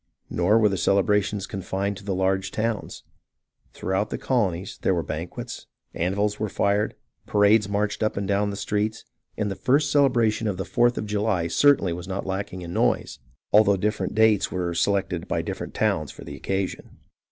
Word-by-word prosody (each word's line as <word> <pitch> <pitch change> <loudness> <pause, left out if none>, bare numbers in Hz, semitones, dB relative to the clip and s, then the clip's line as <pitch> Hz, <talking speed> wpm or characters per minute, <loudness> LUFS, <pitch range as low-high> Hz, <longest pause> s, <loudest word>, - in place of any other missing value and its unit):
Nor 90 +5 +3
were 110 -2 +5
the 95 - -1
celebrations 100 0 +2
confined 100 +1 -3
to 100 - -12
the 95 -1 -2
large 95 0 0
towns. 110 -1 -3 0.7
Throughout 95 +3 -1
the - - -3
colonies 100 -7 -1
there 95 - +2
were 85 - -1
banquets, 80 +3 -6 0.3
anvils 100 +4 -1
were 110 - -1
fired, 100 +2 0 0.3
parades 105 0 +4
marched 105 0 -1
up 110 -2 0
and 100 -1 -2
down 100 +1 +1
the 100 - -4
streets, 105 +2 -2 0.3
and 105 -2 -1
the - - -3
first 140 +6 +2
celebration 120 -6 +3
of 100 -3 -2
the 95 - -3
Fourth 120 0 +2
of - - -2
July 105 -4 0
certainly 115 - +4
was 90 +1 -7
not 95 0 -4
lacking 95 -1 -4
in 85 0 -6
noise, - - 0 0.3
although 100 -1 +6
different 105 +2 -1
dates 110 -2 +3
were 90 -2 -2
selected 90 0 0
by - - -1
different - - -6
towns 75 -2 0
for - - -11
the - - -8
occasion. 95 -1 -4
100 Hz, 175 wpm, -25 LUFS, 95-105 Hz, 0.7 s, although